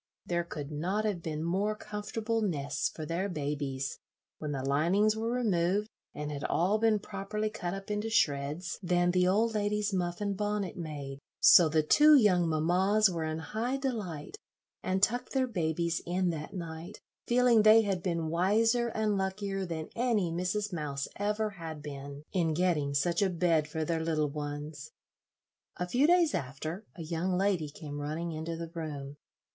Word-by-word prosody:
There 175 -1 0
could 150 -3 -7
not 185 +8 -1
have 200 -5 -1
been 155 -1 -3
more 195 +5 0
comfortable 215 +2 -3
nests 150 -9 -1
for 155 - -7
their 175 +5 -2
babies, 140 -4 -3 0.4
when 150 -1 -4
the 135 -2 -3
linings 180 +10 +3
were 225 +1 -2
removed 205 -4 +1 0.3
and 150 0 -4
had 145 -1 -5
all 195 +5 +2
been 220 -1 +3
properly 210 +1 -4
cut 180 -3 -4
up 195 +1 -7
into 210 +2 -1
shreds, 150 -2 0
than 175 -1 +2
the 180 0 +3
old 220 +5 +2
lady's 210 0 0
muff 175 -2 -1
and 200 -1 -1
bonnet 205 -2 -2
made; 145 -5 -6 0.2
so 170 -3 +8
the 155 0 +2
two 300 - +7
young 185 - +4
mammas 185 +6 +3
were 165 -2 -2
in 155 0 -2
high 220 - -2
delight, 225 - -4 0.4
and 190 +1 -1
tucked 245 +4 +1
their 265 -1 +2
babies 170 -6 -1
in 180 0 +1
that 160 +4 -6
night, 170 +1 -7 0.3
feeling 240 -2 +5
they 215 +1 +7
had 195 -4 -1
been 170 -3 -1
wiser 225 +8 +2
and 215 -3 0
luckier 195 0 -2
than 160 -2 -4
any 230 -8 +1
Mrs. 185 +4 -1
Mouse 145 -4 -3
ever 210 +1 0
had 160 -5 -8
been 140 0 -7
in 165 -4 +1
getting 155 -5 +1
such 170 +7 +1
a 195 - +3
bed 165 -3 +2
for 155 +1 -3
their 160 0 -1
little 155 -3 0
ones. 145 0 -6 0.9
A 180 - -2
few 255 +10 +3
days 345 -2 +4
after 155 - -4
a 170 - -7
young 175 +3 -1
lady 185 -6 +1
came 145 0 -7
running 160 +4 -3
into 160 +1 -4
the 165 -1 -6
room. 145 -4 -5
175 Hz, 170 wpm, -30 LUFS, 155-210 Hz, 0.9 s, so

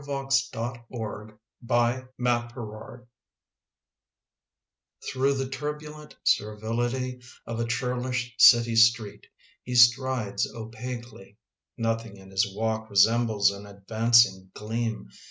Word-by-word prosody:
=,Cooglc 135 -1 0 1.1
nCURE 120 -2 -2 2.1
Through 135 +2 +1
the 135 0 -2
turbnlrat 150 +3 -7
serrility 120 +4 -1 0.2
Of 115 0 -5
a 115 - 0
churlish 125 0 -2
city 120 -1 +7
street 115 -2 +3 0.3
He 125 - -6
strides 120 -2 +3
opaquely; 115 -2 -8 0.4
Dothing 115 -2 -2
in 95 0 -15
his 95 +1 +1
walk 110 +2 -3
Resembles 110 +1 +3
sn 100 +1 -8
advancing 100 -1 +2
gleam. 115 +1 -4
120 Hz, 85 wpm, -26 LUFS, 110-125 Hz, 2.1 s, city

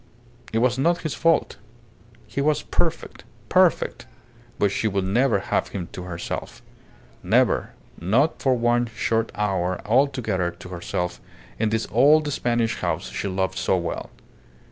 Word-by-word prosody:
It 110 - 0
was 125 +2 +2
not 170 +5 +2
his 155 - -2
fault. 165 -1 +1 0.7
He 140 - -3
was 150 +1 +1
perfect, - - -2 0.3
perfect; - - +2 0.5
but 100 -1 +2
she 110 - 0
would 100 -2 0
never 115 +5 +2
have 95 - -1
him 90 -3 -6
to 90 - -7
herself. 85 -1 -6 0.6
Never; - - +2 0.3
not 115 - +1
for 130 -2 +3
one 120 0 +2
short 115 0 -1
hour 95 -3 0
altogether 120 -7 +1
to 85 +1 -11
herself 90 0 -4 0.4
in 110 -1 +2
this 110 +1 -1
old 145 - +4
Spanish 120 -3 0
house 85 -2 -2
she - - -3
loved 95 0 -1
so 95 - +2
well! 85 -1 -4
110 Hz, 145 wpm, -24 LUFS, 95-130 Hz, 0.7 s, old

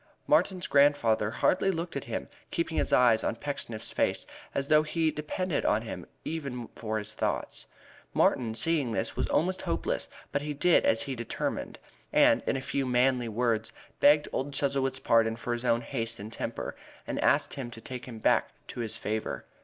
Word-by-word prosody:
Martin's 185 -2 +2
grandfather 140 -7 +4
hardly 180 - +2
looked 170 -1 -2
at 140 - -3
him, - - -4 0.2
keeping - - -2
his - - +1
eyes 120 -3 +5
on - - 0
Pecksniff's 115 -3 -4
face, - - +1 0.3
as 135 0 0
though 155 0 +6
he 155 +1 0
depended 155 +3 -2
on 110 +2 +2
him 115 - -7 0.2
even 140 -7 -4
for 110 -1 -3
his 105 -2 -4
thoughts. - - -2 0.4
Martin, 115 -3 +2
seeing 140 -1 +2
this, 115 - -2
was - - -1
almost 185 +4 +1
hopeless, 85 0 -2 0.2
but 140 - 0
he 150 0 -4
did 175 +4 +4
as 115 - +3
he 140 - -5
had 130 - -4
determined, 120 - -3 0.3
and - - +5
in - - +1
a - - -4
few 135 0 -1
manly 125 -1 +2
words 110 -1 0 0.3
begged 145 +1 +6
old 140 +2 -2
Chuzzlewit's 135 -1 0
pardon 115 -3 +3
for 120 +1 -3
his 120 0 -3
own 115 -1 +3
haste 115 -2 -3
and 105 +3 -7
temper, - - -4 0.3
and - - -3
asked - - +3
him 130 -4 -5
to 115 - -10
take 125 +2 -7
him 120 -3 -7
back 110 - +2 0.2
to - - -7
his 115 -3 -2
favor. 110 +1 -3
125 Hz, 185 wpm, -29 LUFS, 115-145 Hz, 0.4 s, though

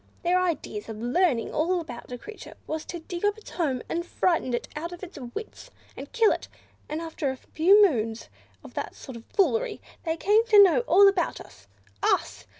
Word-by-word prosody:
Their 360 +1 +3
idea 320 -12 -2
of 225 -1 -7
learning 245 +1 +1
all 350 +4 +1
about 250 -7 -9
a 245 - -4
creature 435 - -11
was 315 0 -4
to 345 - -7
dig 345 +2 -7
up 410 +1 +2
its 435 - -13
home, 275 -8 -1
and 340 - -2
frighten 335 -8 0
it - - -4
out 335 +3 -4
of 350 +1 -10
its 370 -4 -9 0.2
wits, 440 +3 -8 0.3
and - - -9
kill 455 -3 +4
it; - - -3 0.4
and 305 +1 -3
after 320 -4 -3
a 265 - -4
few 395 +10 +5
moons 225 - -3 0.4
of - - -12
that - - -5
sort 260 - -10
of 230 - -11
foolery 455 +4 +1 0.2
they 325 -1 -1
claimed 430 +6 +3
to 415 -2 +8
know 375 +1 +5
all 400 +1 +7
about 390 -3 +1
us. 95 +1 -15 0.3
Us! - - 0
340 Hz, 200 wpm, -26 LUFS, 265-395 Hz, 0.4 s, to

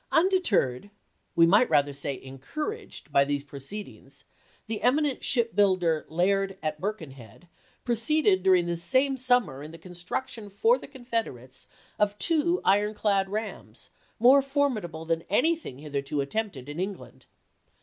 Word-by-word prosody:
Undeterred, 320 - +2 0.5
we 165 -1 +6
might 205 +8 +4
rather 145 -2 +2
say 140 -1 -4
encouraged, 300 - -6
by 140 -1 +5
these 140 0 -2
proceedings, 145 +9 -9 0.4
the 220 -1 -4
eminent 280 +2 +1
ship 235 -3 +1
builder 185 -6 +2
Laird, 195 +3 +1
at 155 -1 -3
Birkenhead, 160 - -7 0.4
proceeded 235 -3 +2
during 185 -2 +4
this 170 -1 -2
same 265 +8 +2
sum 250 -2 +3
mer 135 -3 -9
in 150 - -8
the 165 - -11
construction 185 +6 -6
for 455 - +2
the - - -10
Confederates 230 - -5 0.3
of 205 0 +1
two 340 - +1
iron 205 +2 +3
clad 195 -2 +1
rams 215 +2 -6 0.3
more 260 +4 +6
formidable 255 - -1
than 165 0 0
anything 310 - +1
hitherto 145 0 -4
attempted 140 - -3
in 145 +3 -6
England. 195 +1 -6
195 Hz, 140 wpm, -27 LUFS, 155-245 Hz, 0.5 s, we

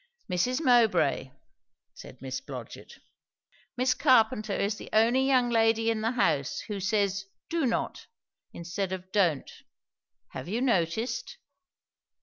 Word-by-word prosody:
"Mrs. 245 - 0
Mowbray," 240 -3 +3 0.6
said - - -13
Miss - - -4
Blodgett, - - -9 0.8
"Miss 255 +1 +2
Carpenter 225 -6 +3
is 205 +2 -1
the - - -10
only 235 +5 +3
young 250 -3 +3
lady 225 0 +3
in 220 -1 -2
the 225 +3 0
house 150 - 0
who 205 -3 -5
says 200 -1 0 0.3
'do 325 -5 +1
not' 230 - -3 0.4
instead 180 +3 -4
of 185 0 -7
don't; 175 -9 +1 0.8
have - - -8
you 215 +6 -2
noticed?" 230 - -1
225 Hz, 125 wpm, -28 LUFS, 195-245 Hz, 0.8 s, Mowbray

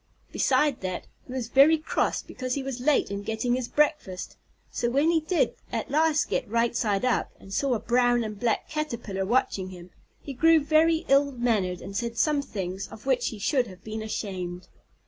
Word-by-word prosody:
Beside 295 -4 +2
that, 185 -1 -4 0.2
he - - -10
was 250 -3 -4
very 280 +5 +6
cross 310 - -1
because 255 -1 -4
he 280 - -3
was 265 -2 -4
late 275 -4 +2
in 200 0 -3
getting 220 +3 -1
his 250 -1 -1
breakfast, 295 - 0 0.4
so 240 - -1
when 285 +6 +3
he 330 - +3
did 325 +3 +1 0.2
at - - -3
last 310 0 +3
get - - -2
right 235 +1 +1
side 210 0 +1
up, 250 - +1
and 195 - -11
saw 270 +3 +1
a - - -2
brown 245 0 +2
and 215 -2 -6
black 235 -1 0
Caterpillar 235 -11 -3
watching 200 -5 +1
him, 180 -1 -11 0.3
he 280 - -7
grew 325 +5 +5
very 320 +3 +3
ill 280 +1 +4
mannered, 220 -8 0
and 195 - -8
said 235 +2 -3
some 295 +3 +2
things 190 -6 -5
of 215 - -13
which 250 -3 +1
he 220 - -4
should 245 +4 +1
have 185 -1 -13
been 220 0 -5
ashamed. 185 -4 -5
240 Hz, 195 wpm, -26 LUFS, 205-280 Hz, 0.4 s, very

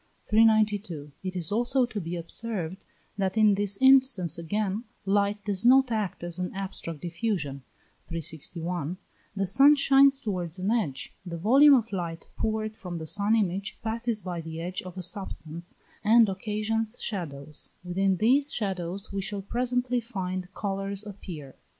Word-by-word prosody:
392. 210 -8 +2
It 185 -1 -5
is 175 -1 -1
also 245 +4 +3
to 220 -4 -5
be 170 +1 -4
observed 180 0 -3 0.4
that 190 +2 0
in 215 -2 +6
this 200 0 -1
instance 265 - +5
again 205 +5 -2 0.2
light 200 +1 +1
does 200 -1 -1
not 260 +1 +6
act 210 -6 -2
as 175 0 -4
an 180 - -2
abstract 185 -5 -6
diffusion 170 -6 -2 0.5
(361), 165 +1 -4 0.4
the 195 0 0
sun 275 +10 +6
shines 275 -1 +5
towards 180 - -3
an 190 +3 -1
edge. 170 - -1
The 170 -2 -6
volume 275 - +7
of 230 -3 0
light 170 -4 -4
poured 215 0 -2
from 180 -5 -6
the 160 - -6
sun 205 +6 +2
image 200 -1 -1
passes 225 -1 -1
by 175 -2 -4
the 160 0 -7
edge 180 +2 -4
of 185 0 -10
a 185 - -4
substance, 170 -2 -5 0.3
and 225 +1 +6
occasions 215 +3 -2
shadows. 150 -7 -5
Within 190 +1 +1
these 270 - +3
shadows 195 -1 -3
we 195 - -1
shall 200 0 -4
presently 245 +2 0
find 185 -5 -4
colours 195 0 -3
appear. 170 -9 -8
195 Hz, 150 wpm, -27 LUFS, 175-225 Hz, 0.5 s, volume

